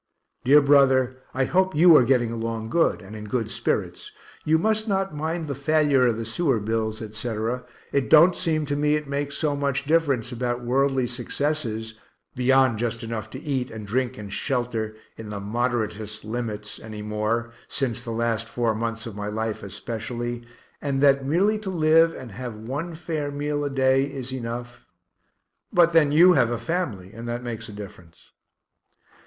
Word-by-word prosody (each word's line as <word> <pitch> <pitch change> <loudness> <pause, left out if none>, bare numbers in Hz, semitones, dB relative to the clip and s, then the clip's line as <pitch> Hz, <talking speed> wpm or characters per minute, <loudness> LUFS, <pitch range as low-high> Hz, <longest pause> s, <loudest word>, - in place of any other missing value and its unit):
Dear 145 +3 +6
brother, 130 -2 +4
I 135 0 0
hope 185 +3 +1
you 165 +1 +8
are - - +8
getting 120 -2 +2
along 115 -1 -4
good, 165 -10 +2
and 100 +3 -10
in 105 0 -7
good 110 +1 -2
spirits; - - -2 0.3
you 160 +1 +3
must 220 +4 +1
not 195 -3 0
mind 160 +2 -3
the 140 - -2
failure 140 -2 +3
of 115 -2 +1
the 115 - -4
sewer 130 +1 +1
bills, 110 +1 -2
etc. 110 +2 -3 0.3
It 140 -2 0
don't 170 +3 +7
seem 160 -4 0
to 145 0 -2
me 150 +1 +2
it 150 -1 -3
makes 140 0 -2
so 150 -3 0
much 140 -1 -1
difference 140 -6 +1
about 120 0 -2
worldly 135 +1 +2
successes 120 -3 -3 0.3
(beyond 130 -2 +3
just 115 0 -2
enough 110 -2 -4
to 130 - -7
eat 135 -4 -2
and 110 -2 -8
drink 125 +4 -1
and 100 -1 -7
shelter, 120 -5 -2 0.2
in 110 -1 -8
the 105 -1 -5
moderatest 110 -1 -2
limits) 110 -2 -5
any 110 -1 -8
more, 105 +2 -1 0.2
since 120 -3 -2
the 120 - -7
last 115 -1 -1
four 115 -2 0
months 115 +1 -3
of 115 -4 -7
my 105 0 -4
life 110 +1 -3
especially, 115 +4 -5 0.4
and 140 -2 -1
that 140 -1 +5
merely 190 +10 +2
to 210 -2 -5
live, 165 -1 +4
and 130 -3 -9
have 120 +2 -6
one 140 +10 -5
fair 155 -3 -3
meal 145 +1 -2
a 145 - -1
day, 135 0 +3
is 135 -2 -6
enough 120 -1 -6 0.9
but 170 -1 +4
then 155 -3 +5
you 175 +4 +7
have 120 - +3
a 120 - -1
family, 115 - -3
and 115 +2 -8
that 120 +1 -3
makes 115 -2 -6
a - - -7
difference. 100 -5 -12
125 Hz, 175 wpm, -24 LUFS, 110-145 Hz, 0.9 s, you